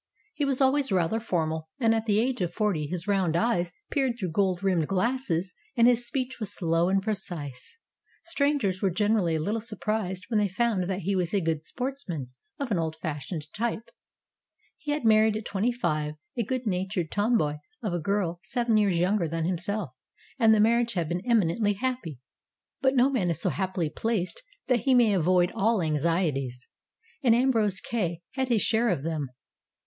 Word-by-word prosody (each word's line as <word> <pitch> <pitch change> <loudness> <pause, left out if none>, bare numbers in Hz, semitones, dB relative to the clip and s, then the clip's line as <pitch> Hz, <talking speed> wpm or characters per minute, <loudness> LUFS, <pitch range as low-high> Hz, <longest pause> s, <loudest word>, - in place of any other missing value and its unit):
He 290 - -1
was 275 -1 0
always 270 -1 +3
rather 185 +4 +1
formal, 160 -7 -2
and 225 -3 +4
at 225 0 -1
the 210 0 +3
age 250 -1 0
of 175 -1 0
forty 185 -7 0
his 175 +3 -4
round 190 -5 +1
eyes 180 -5 +1 0.2
peered 265 -4 +1
through 185 -7 -3
gold 185 +1 +1
rimmed 180 -5 +2
glasses 195 -4 0 0.2
and 235 0 +6
his 245 -1 +3
speech 260 0 -3
was 215 -4 -3
slow 165 0 +1
and 195 0 +2
precise. 180 - -5 0.5
Strangers 280 - 0
were 195 - +3
gener 210 +4 +2
ally 170 -4 0
a 160 - 0
little 210 +8 -1
surprised 210 -4 -3
when 225 -3 +1
they 205 - +2
found 200 -1 0
that 190 +1 -2
he 195 +3 0
was 180 +1 0
a - - +4
good 160 -3 -1
sportsman, 220 - -4 0.3
of 275 -4 -4
an 190 - +2
old 160 -1 -2
fashioned 155 0 -5
type. 230 0 -3 0.9
He 300 - -8
had 295 -4 -1
married 215 0 +5
at 215 - -7
twenty 200 +5 0
five 155 -10 -1 0.2
a 240 - 0
good 255 +3 -3
natured 185 -3 -1
tomboy 205 -9 +1 0.3
of 205 -5 -1
a 175 - 0
girl 175 -1 -1
seven 235 -1 +1
years 200 -5 +3
younger 180 +1 +2
than 165 +1 -2
himself, 185 - -2 0.5
and 225 -3 +6
the 215 - +5
mar 230 +3 +4
riage 235 0 -1
had 170 -4 -1
been 175 +1 -1
eminently 210 -2 +2
happy. 245 - -3 0.6
But 265 0 +3
no 260 +2 +4
man 205 -10 +1
is 165 - -1
so - - +1
happily 185 -5 -2
placed 220 - -2 0.2
that 250 -2 +2
he 260 +3 +3
may 235 -4 +5
avoid 180 0 +3
all 225 +1 +2
anxieties, 150 -5 0 0.5
and 240 -5 +5
Ambrose 225 -6 +2
Kay 180 -8 -2
had 265 0 -1
his 225 -5 +3
share 230 +1 +2
of 170 -8 -1
them. 155 -4 -2
200 Hz, 190 wpm, -27 LUFS, 170-235 Hz, 0.9 s, and